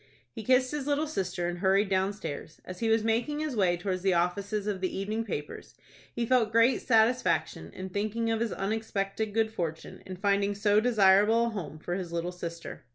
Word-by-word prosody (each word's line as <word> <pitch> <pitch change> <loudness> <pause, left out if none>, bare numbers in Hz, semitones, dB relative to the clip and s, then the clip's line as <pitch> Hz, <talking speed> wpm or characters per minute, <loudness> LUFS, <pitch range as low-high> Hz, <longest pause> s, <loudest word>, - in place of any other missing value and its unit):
He 220 - -8
kissed 255 +2 +3
his 295 -2 -4
little 295 +1 +1
sister, 185 - -2
and 175 0 -4
hurried 195 +2 +3
downstairs. 190 -5 -3
As 185 -1 -8
he 225 - 0
was 225 -1 +3
making 230 +6 0
his 305 -4 -2
way 180 -4 +2
towards 185 +1 -3
the 190 -1 +2
offices 195 +4 -1
of 200 -3 -2
the 185 - -2
evening 215 +3 -2
papers, 150 -9 -6 0.4
he 235 - -2
felt 230 -3 +2
great 230 +3 +4
satisfaction 235 +1 +1
in 190 0 -7
thinking 215 +4 -1
of 225 - 0
his 235 -1 -1
unexpected 205 0 -2
good 220 +1 +1
fortune 165 -6 -5
in 185 - -6
finding 200 +1 +1
so 205 +1 +3
desirable 215 0 +4
a - - 0
home 165 -9 -6
for 175 +3 -5
his 180 -2 -4
little 170 +1 -2
sister. 170 -2 -7
205 Hz, 195 wpm, -29 LUFS, 185-225 Hz, 0.4 s, great